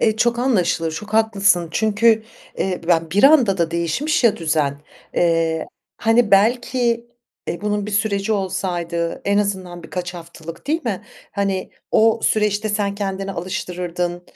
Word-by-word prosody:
Eee, 220 -1 +2
çok 235 +1 +2
anlaşılır. 180 -10 +1
Çok 210 +6 -6
haklısın 200 -6 +3
çünkü, 220 +2 +3 0.4
eee, 185 -2 -1
b - - -10
ben 165 -2 +2
bir 205 +9 +3
anda 255 -10 +5
da 170 -1 +1
değişmiş 170 - 0
ya 225 - +5
düzen. 155 -3 0 0.3
Eee, 165 -2 +1 0.3
hani, 225 -1 +2
belki, 235 +3 +2 0.4
eee, 170 - -3
bunun 210 0 -1
bir - - -5
süreci 200 0 0
olsaydı, 175 -4 -2
en 200 0 +2
azından 190 -4 -2
birkaç 175 +1 -5
haftalık, 165 +1 -10
değil 315 +3 0
mi? 210 -6 -2 0.3
Hani, 195 -2 -2 0.2
o 225 +1 +4
süreçte 210 0 +1
sen 205 -1 -1
kendini 195 -1 -3
alıştırırdın, 180 -2 -4
195 Hz, 145 wpm, -20 LUFS, 175-220 Hz, 0.4 s, anda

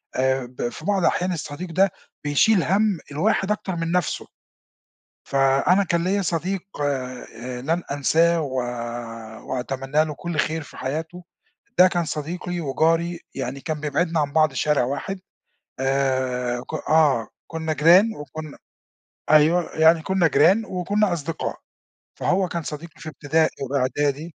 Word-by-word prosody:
آآ 130 0 +1
ب 120 -1 -4
في 155 - -10
بعض 195 -2 +1
أحيان 180 +1 +1
الصديق 165 +2 -6
ده 190 +3 +3 0.3
بيشيل 165 +7 +3
هَم 205 +1 +2
الواحد 195 +6 +1
أكتر 195 -3 -2
من 165 0 -2
نَفسُه. 180 -2 -1 1.0
فأنا 140 +8 +3
كان 170 -1 0
ليا 200 +2 +1
صديق 180 +2 -1 0.2
آآ 125 -3 -4
لن 165 +6 0
أنساه 165 +4 +3
و 135 -3 -4 0.9
وأتمنى 135 +3 -1
له 155 -1 -5
كل 170 +3 -5
خير 160 +1 0
في - - -13
حياته. 160 +6 -4 0.5
ده 185 +1 +8
كان 175 -1 0
صديقي 175 +4 -4
وجاري 165 +3 +1
يعني 135 +1 -4
كان 155 0 -4
بيبعدنا 160 +3 0
عن 145 -1 -1
بعض 155 -1 +3
شارع 145 +1 +2
واحد. 140 +9 -4 0.6
آآ 130 -2 0
ك 130 - -11 0.2
آه 145 -8 +4 0.2
كنّا 160 -1 -3
جيران 175 +9 +5
وكنّا 150 +1 -8 0.7
أيوَه 160 +3 +4
يعني 160 +1 +5
كنّا 190 -2 +2
جيران 175 +10 +4
وكنّا 195 +2 0
أصدقاء 165 0 -3 0.6
فهو 185 0 +1
كان 170 0 -3
صديقي 155 +2 -8
في 160 - -7
ابتدائي 155 +2 +1
وإعدادي. 140 +4 -1
160 Hz, 140 wpm, -23 LUFS, 140-175 Hz, 1.0 s, ده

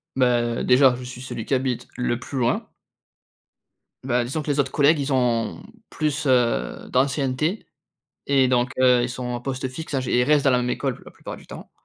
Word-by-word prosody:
Beh, 120 -2 +1
déjà, 130 0 +5
je 125 - -8
suis 125 0 -8
celui 120 -3 -6
qui - - -2
habite 130 -2 -1
le 125 -1 0
plus 135 +2 -7
loin. 120 -1 0 1.4
Beh, 125 -2 +1
disons 135 +6 -3
que 145 - -1
les 145 - -1
autres 135 -1 +1
collègues, 150 +2 +4
ils 140 0 -1
ont 120 -3 0 0.3
plus, 150 -1 -2
heu, 120 - +1
d'ancienneté 135 - 0 0.6
et 135 -2 +4
donc, 125 0 +1
heu, 125 -1 +5
ils 120 - -1
sont 125 0 -6
en 120 0 -3
poste 130 0 -3
fixe 150 +4 -7
à 135 - +1
j 125 - -4
et 125 - +4
ils - - +4
restent 145 +1 +3
dans 135 - +5
la 125 - +3
même 125 0 -1
école 135 0 -2
plu - - -17
la - - -12
plupart - - -9
du - - -16
temps. - - -11
130 Hz, 220 wpm, -23 LUFS, 125-140 Hz, 1.4 s, déjà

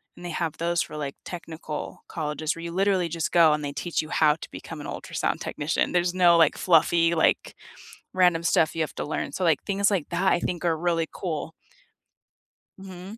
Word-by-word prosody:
and 175 - -11
they 175 - -4
have 160 -1 -3
those 170 +1 0
for, 150 - -5
like, 140 -2 -4
technical 160 -3 -7
colleges, 155 0 -2
where 165 - -8
you 170 - -5
literally 190 -2 +2
just 165 -1 -2
go, 165 -3 +6
and 150 0 -2
they 140 - -3
teach 175 +1 -2
you 155 - -9
how 150 -1 +3
to 165 - -11
become 160 -3 -8
an - - -7
ultrasound - - -3
technician. 150 +2 -1
There's 175 0 +2
no, 175 -2 +5
like, 160 -3 +4
fluffy, 170 0 +3
like, 160 - +1 0.6
random 175 -3 +3
stuff 160 -1 +2
you - - -2
have 155 - -4
to - - -3
learn, - - -3
so, 185 - -2
like, 160 -4 +3
things 200 +1 +1
like 185 -7 -1
that, 180 +3 +2
I 175 - +2
think 175 -1 -3
are 165 -2 +2
really 165 -1 0
cool. 160 -3 -4 1.3
Mhm. 190 +3 -10
170 Hz, 205 wpm, -25 LUFS, 155-180 Hz, 1.3 s, go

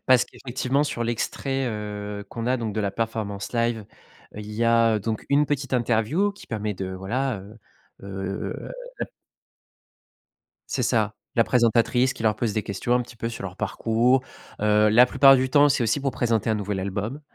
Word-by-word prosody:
parce 130 -2 +5
qu'effectivement 130 +2 -1
sur 120 -5 -3
l'extrait, 130 +3 -2
heu, 105 -2 -5
qu'on 115 0 -5
a 130 +1 +2
donc 115 -3 -3
de 110 - -2
la 100 -2 -1
performance 110 -2 -3
live, 115 -2 0 0.5
il 105 0 -7
y 110 +2 -2
a 115 -2 +4
donc 110 +1 -3
une 145 +1 +4
petite 140 -2 -2
interview 125 - +1
qui 200 - -14
permet 105 -1 -3
de 95 -1 -5
voilà, 105 +7 -2
heu 105 +4 -13 0.5
heu 95 0 -5 2.0
C'est 130 - 0
ça, 110 -3 +1 0.2
la 115 - +5
présentatrice 120 +2 +3
qui - - -9
leur 110 -1 +2
pose 115 -3 -1
des 110 - 0
questions 100 +4 -2
un 125 - +3
petit 120 0 -11
peu 115 - -3
sur 115 - -6
leur 95 -1 -6
parcours, 120 +3 +1 0.4
heu, 105 0 +4
la 120 +4 +6
plupart 135 +1 +7
du 130 0 0
temps, 145 +2 +6
c'est 140 -2 +2
aussi 115 +4 +1
pour 135 -1 -1
présenter 115 -4 0
un - - +2
nouvel 105 -2 -2
album, 100 +9 -3
115 Hz, 180 wpm, -24 LUFS, 105-125 Hz, 2.0 s, plupart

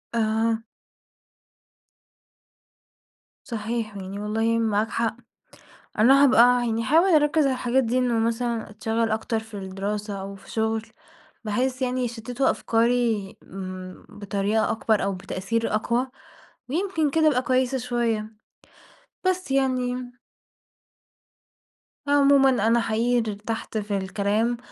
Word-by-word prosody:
آه. 225 0 +1 2.8
صحيح 225 -2 -4
يعني 195 +1 -6
والله 225 +2 0
معاك 220 -1 +1
حق. 230 0 -1 0.8
أنا 270 +5 +6
هابقى 260 -4 +6 0.3
يعني 225 0 0
هاحاول 320 - +4
أركِز 300 +1 +3
على 270 - +2
الحاجات 255 +1 +1
دي 240 +2 0
إنه 245 -3 +1
مثلًا 230 0 -1
أتشغل 220 +2 -1
أكتر 220 +1 -1
في 220 0 -14
الدراسة 200 +1 -4
أو 195 +1 -7
في 195 - -14
شغل 220 0 0 0.6
بحيث 250 +4 -1
يعني 255 0 0
يشتتوا 240 +3 -1
أفكاري، 230 -3 0
امم، 185 -1 -8
بطريقة 205 +1 -1
أكبر 220 -1 +1
أو 195 0 0
بتأثير 195 +5 -2
أقوى 235 +4 0 0.6
ويمكن 325 0 0
كده 320 0 +3
أبقي 260 -5 +3
كويسة 255 0 +1
شوية. 235 -3 -2 0.9
بس 370 -5 0
يعني 255 -2 0 2.0
عمومًا 280 -1 +5 0.2
أنا 235 +1 +4
حقيقي 230 0 +1
ارتحت 220 +2 -5
في 205 -1 -2
الكلام 205 +5 0
230 Hz, 110 wpm, -24 LUFS, 215-250 Hz, 2.8 s, أنا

